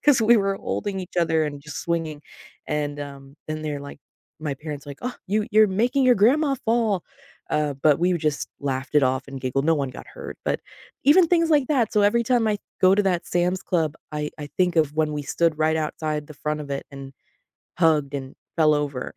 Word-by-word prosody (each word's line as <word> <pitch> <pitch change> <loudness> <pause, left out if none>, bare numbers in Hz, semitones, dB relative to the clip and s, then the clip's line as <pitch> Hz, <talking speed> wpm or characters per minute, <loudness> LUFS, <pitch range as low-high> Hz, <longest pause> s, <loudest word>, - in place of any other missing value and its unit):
'cause 285 -5 +5
we 235 +2 +6
were 195 -1 0
holding 195 0 -3
each 180 -1 -10
other 160 -1 +2
and 145 -1 -5
just 150 0 -7
swinging, 160 -3 -2 0.4
and, 145 -1 -2
um, 140 -1 -9
then 155 0 -3
they're 150 -2 -3
like 140 0 -10 0.4
my 150 -3 -2
parents 145 0 -7
are - - -7
like, 140 - -9
"Oh, 250 0 -3
you, 210 +2 +1
you're 215 0 +6 0.2
making 265 +2 +2
your 250 -1 +6
grandma 275 +7 +3
fall." 220 -5 +1 0.5
Uh, 150 -2 0
but 145 +2 +3
we 180 +1 +2
just 150 -2 -1
laughed 135 0 -3
it 145 - +5
off 130 +1 0
and 135 -1 -7
giggled. 130 +2 -1
No 165 - +5
one 140 -2 -2
got - - -10
hurt. - - -8
But - - 0 0.4
even 330 +5 +6
things 335 -1 +3
like 290 -4 +4
that. 250 -7 +1
So 210 - +3
every 220 +4 +3
time 240 -2 +2
I 210 - +1 0.2
go 185 +1 +6
to 205 - +3
that 180 -3 0
Sam's 180 +2 0
Club, 160 -3 0 0.2
I 150 0 -2
I 150 - -5
think 180 -2 +2
of 155 -2 +2
when 155 -1 +1
we 150 - -2
stood 160 +2 0
right 155 0 +2
outside 155 -1 -2
the 155 - -10
front 150 +1 -3
of 140 - -10
it 140 - -3
and 135 0 -9 0.7
hugged 155 -4 +3
and 135 -1 -6 0.2
fell 155 -2 +5
over 140 -3 -3
155 Hz, 220 wpm, -24 LUFS, 145-205 Hz, 0.7 s, we